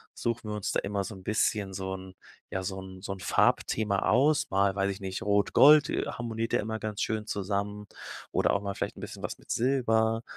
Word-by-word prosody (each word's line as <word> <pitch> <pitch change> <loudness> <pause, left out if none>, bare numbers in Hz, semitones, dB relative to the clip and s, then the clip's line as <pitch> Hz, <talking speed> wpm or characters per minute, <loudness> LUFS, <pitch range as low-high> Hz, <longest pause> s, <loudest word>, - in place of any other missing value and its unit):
suchen 115 -2 -2
wir - - -2
uns 100 - -2
da - - +1
immer 100 0 -2
so 110 - -6
'n 95 - -12
bisschen 105 -1 0
so 95 0 -3
'n 95 0 -10 0.4
ja, 95 0 -2
so 95 0 -4
'n 95 -1 -10
so 100 - -4
'n 95 - -10
Farbthema 100 +2 +2
aus, 145 +5 +3
mal, 100 0 +3
weiß 100 0 +1
ich 100 +1 -8
nicht, 95 -1 -4
Rot 100 0 +1
Gold 150 +1 +7
harmoniert 115 -1 -3
ja - - +4
immer 110 +1 -4
ganz 105 -1 -4
schön 110 0 -2
zusammen 100 +1 -2 0.5
oder - - +2
auch 100 - +1
mal 100 -1 -2
vielleicht - - -4
'n - - -9
bisschen - - -8
was - - -4
mit - - -10
Silber 115 -3 +2
105 Hz, 220 wpm, -29 LUFS, 95-110 Hz, 0.5 s, Gold